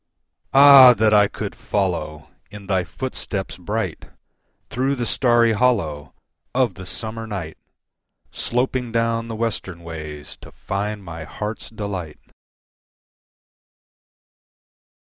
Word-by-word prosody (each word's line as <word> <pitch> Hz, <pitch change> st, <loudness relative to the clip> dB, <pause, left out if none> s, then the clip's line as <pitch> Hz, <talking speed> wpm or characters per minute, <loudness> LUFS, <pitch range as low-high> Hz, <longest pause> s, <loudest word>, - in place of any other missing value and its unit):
Ah! 135 Hz, -2 st, +9 dB
that 110 Hz, 0 st, +3 dB
I 105 Hz, -1 st, +6 dB
could -, -, -6 dB
follow 75 Hz, -6 st, -3 dB, 0.2 s
In 105 Hz, 0 st, -11 dB
thy 95 Hz, -2 st, +1 dB
footsteps 100 Hz, -5 st, -5 dB
bright, 95 Hz, -1 st, -3 dB, 0.7 s
Through 135 Hz, +3 st, 0 dB
the 120 Hz, -2 st, -3 dB
starry 120 Hz, -2 st, +3 dB
hollow 95 Hz, -, 0 dB, 0.4 s
Of 130 Hz, -2 st, +2 dB
the 95 Hz, -1 st, -10 dB
summer 115 Hz, +3 st, -6 dB
night, 90 Hz, -7 st, -5 dB, 0.8 s
Sloping 125 Hz, 0 st, -1 dB
down 115 Hz, 0 st, 0 dB
the 115 Hz, -, -5 dB
western 100 Hz, -6 st, -4 dB
ways 75 Hz, -3 st, -8 dB
To -, -, -14 dB
find 100 Hz, +1 st, -4 dB
my 85 Hz, -2 st, -8 dB
heart's 105 Hz, +8 st, -6 dB
delight! 100 Hz, -8 st, -5 dB
105 Hz, 105 wpm, -22 LUFS, 90-115 Hz, 0.8 s, Ah